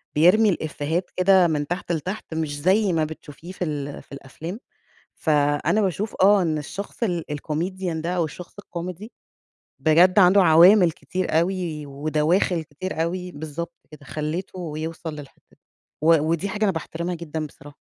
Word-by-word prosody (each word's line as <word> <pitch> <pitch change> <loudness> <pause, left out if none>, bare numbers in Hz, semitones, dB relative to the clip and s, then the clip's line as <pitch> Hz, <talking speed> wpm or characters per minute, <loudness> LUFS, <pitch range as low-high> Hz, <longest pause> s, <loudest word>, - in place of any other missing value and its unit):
بيرمي 185 +8 +5
الإفِيهات 160 +1 -2
كده 185 -1 +5
من 150 -3 -1
تحت 175 0 -3
لتحت، 180 +4 -4
مش 150 -3 -3
زي 190 +3 +3
ما 160 -1 +2
بتشوفيه 160 +2 -10
في 185 - -5
ال 145 -2 -4
في - - -32
الأفلام، 150 - -8 0.6
فأنا 145 +6 +1
باشوف 195 +3 -2
آه، 200 0 +6
إن 160 -3 0
الشخص 200 +9 -6
ال 175 -6 -1
الcomedian 170 +4 -3
ده 170 - -3
أو 175 -2 +1
الشخص 170 +4 -10
الكوميدي، 180 +4 -7 0.7
بجد 175 +5 +5
عنده 190 +1 +7
عوامل 175 +3 +7
كتير 180 -2 -2
أوي، 170 -4 -2
ودواخل 155 +5 0
كتير 160 +2 -4
أوي، 180 +2 -3
بالضبط 160 +3 -6 0.2
كده، 150 -2 -13
خلِّته 165 +3 -4
يوصل 160 0 -5
للحتة 140 -2 -12
دي، - - -25 0.4
و 165 +1 +6
ودي 165 +5 0
حاجة 210 +2 -1
أنا 200 - +3
باحترمها 170 +1 -4
جدًا 160 -2 -5
بصراحة. 145 0 -15
170 Hz, 155 wpm, -23 LUFS, 155-185 Hz, 0.7 s, عنده